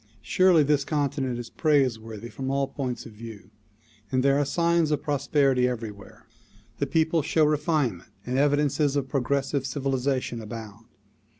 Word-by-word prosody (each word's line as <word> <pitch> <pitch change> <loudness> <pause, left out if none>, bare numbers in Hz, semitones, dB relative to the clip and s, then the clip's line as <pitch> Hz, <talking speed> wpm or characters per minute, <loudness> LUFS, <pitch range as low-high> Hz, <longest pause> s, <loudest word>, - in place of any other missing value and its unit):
Surely 185 -4 +4
this 145 0 +2
J - - -14
continent 140 -4 -1
is 120 -1 -7
praiseworthy 115 -7 0
from 135 +1 -5
all 135 0 0
points 130 -2 -4
of 115 - -10
view 105 -2 -11 0.6
and 130 0 +1
there 140 +1 +3
are - - +3
signs 170 +2 +2
of 150 -2 -1
prosperity 135 -3 +2
everywhere. 110 -5 -7 0.5
The - - 0
people 160 0 +2
show 155 +1 +2
refinement, 150 - 0 0.2
and 125 - -2
evidences 145 0 +2
of 140 -2 -1
progressive 140 +1 -1
civilization 135 -3 -1
abound. 110 0 -9
135 Hz, 145 wpm, -26 LUFS, 120-150 Hz, 0.6 s, Surely